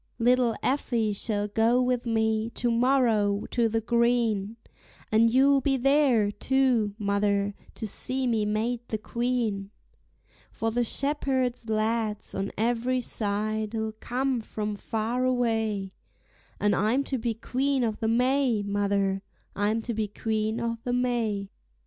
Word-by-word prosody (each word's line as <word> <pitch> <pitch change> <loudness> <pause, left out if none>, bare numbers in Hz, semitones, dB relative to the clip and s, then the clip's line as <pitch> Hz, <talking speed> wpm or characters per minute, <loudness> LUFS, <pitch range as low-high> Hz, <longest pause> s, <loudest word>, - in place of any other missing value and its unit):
Little 245 -1 +3
Effie 235 -5 0
shall 205 0 -1
go 225 +4 +2
with 250 -1 0
me 220 -1 +1
to 240 -1 0
morrow 230 -5 +2
to 235 -2 +2
the 225 +1 0
green, 230 -2 +1 0.5
And 225 +1 +4
you'll 275 +2 +4
be 270 0 +1
there, 260 -5 +3
too, 245 -3 +1
mother, 200 -1 0 0.2
to 220 - -5
see 255 +5 -1
me 225 -3 +1
made 220 +3 -1
the 220 - -2
Queen; 230 -3 -2 0.8
For 225 0 -2
the 240 +2 +1
shepherd 260 -3 -1
lads 215 -1 -1
on 195 +1 -3
every 240 +3 +1
side'll 215 0 -2
come 255 0 -1
from 210 -1 -4
far 225 +4 -2
away; 225 -6 0 0.7
And 205 -1 +2
I'm 225 +7 +2
to 265 -2 -3
be 230 0 -2
Queen 265 +3 0
o'the 220 -1 -1
May, 250 -1 +2
mother, 200 -1 0 0.3
I'm 215 +3 0
to 235 - -3
be 215 -1 -1
Queen 220 +2 -2
o'the 235 +1 -3
May. 230 -5 -1
225 Hz, 130 wpm, -27 LUFS, 210-245 Hz, 0.8 s, And